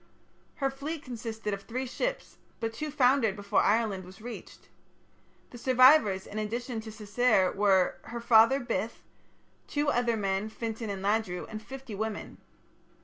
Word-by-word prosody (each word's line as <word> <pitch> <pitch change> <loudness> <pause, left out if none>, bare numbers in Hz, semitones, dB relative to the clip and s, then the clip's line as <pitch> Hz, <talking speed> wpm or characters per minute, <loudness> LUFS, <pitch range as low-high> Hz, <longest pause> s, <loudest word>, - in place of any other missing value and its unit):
Her 270 -1 0
fleet 290 +3 -5
consisted 225 -3 -5
of 200 - -4
three 250 +5 -4
ships, - - -4 0.2
but 225 -1 -2
two 300 +7 -4
foundered 255 -6 +3
before 205 0 +1
Ireland 210 -3 +1
was 185 +2 -13
reached. 235 +2 -10 0.8
The 240 - -10
survivors 255 -6 +5
in 215 - -5
addition 230 +2 -3
to 220 0 -9
Cessair 215 -2 +2
were, 195 -2 +3
her 235 +1 -6
father 230 +3 +5
Bith, 230 -3 -3 0.6
two 290 0 0
other 240 -3 +1
men, 195 +1 -1
Fintan 225 0 -5
and 195 -1 -4
Ladru, 200 -3 0
and 215 -1 -7
fifty 265 0 -9
women. 215 +1 -5
225 Hz, 145 wpm, -29 LUFS, 205-250 Hz, 0.8 s, survivors